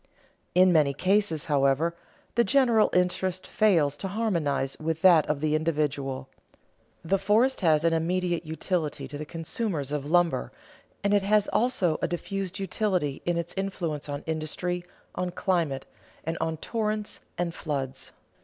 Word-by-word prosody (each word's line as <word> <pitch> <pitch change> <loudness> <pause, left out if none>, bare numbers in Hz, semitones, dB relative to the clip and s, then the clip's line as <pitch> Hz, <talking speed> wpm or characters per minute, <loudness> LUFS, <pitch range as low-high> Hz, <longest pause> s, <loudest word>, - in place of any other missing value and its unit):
In 180 0 +6
many 145 -4 +3
cases, 185 -2 +1
however, 145 +3 +2 0.4
the 235 - +4
general 240 -5 +4
interest 180 0 0
fails 165 -10 +2
to 195 - -4
harmonize 170 -10 -1
with 160 0 -2
that 170 -5 +6
of 150 -1 -1
the 155 -1 +1
individual. 145 -4 -1 0.8
The 195 +4 +2
forest 220 +7 +3
has 160 -3 +3
an 165 0 +3
immediate 175 +1 0
utility 160 -1 -2
to 145 - -8
the 155 - -6
consumers 165 - -2
of 145 -1 -2
lumber, 170 - +2 0.5
and 200 0 +2
it 205 - +4
has 205 +1 +3
also 215 -9 +1
a - - +1
diffused 190 +1 -4
utility 185 -7 -1
in 175 -1 +1
its 170 0 -2
influence 170 -7 -3
on 145 0 -4
industry, 160 +3 -2 0.3
on 180 - -2
climate, 170 -7 -1 0.4
and 165 +1 -2
on 160 -1 -1
torrents 215 +2 -2 0.2
and 175 -1 -1
floods. 135 -5 -4
170 Hz, 145 wpm, -27 LUFS, 150-195 Hz, 0.8 s, In